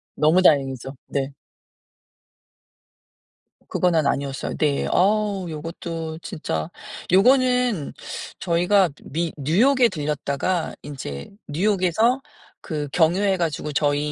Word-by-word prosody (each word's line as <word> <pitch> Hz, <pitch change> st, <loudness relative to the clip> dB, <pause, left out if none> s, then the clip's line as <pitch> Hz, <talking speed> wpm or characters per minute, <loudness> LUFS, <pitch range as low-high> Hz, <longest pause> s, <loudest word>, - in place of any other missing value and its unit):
너무 155 Hz, +4 st, +4 dB
다행이죠. 135 Hz, -6 st, +2 dB, 0.2 s
네. 140 Hz, 0 st, -2 dB, 2.4 s
그거는 170 Hz, -4 st, +2 dB
아니었어요. 140 Hz, -1 st, -2 dB
네. 145 Hz, -3 st, +1 dB
어 205 Hz, 0 st, +2 dB
요것도 165 Hz, 0 st, -5 dB
진짜 150 Hz, -, -4 dB, 0.4 s
요거는 250 Hz, -, +3 dB, 0.5 s
저희가 180 Hz, +2 st, +3 dB
미 165 Hz, +2 st, -2 dB
뉴욕에 235 Hz, -, +4 dB
들렸다가 150 Hz, +1 st, -2 dB
인제 130 Hz, -, -7 dB, 0.2 s
뉴욕에서 200 Hz, -, +2 dB, 0.4 s
그 150 Hz, -3 st, -4 dB
경유해 185 Hz, +4 st, +3 dB
가지고 160 Hz, -3 st, -2 dB
저희 145 Hz, 0 st, +1 dB
165 Hz, 215 characters per minute, -23 LUFS, 145-195 Hz, 2.4 s, 너무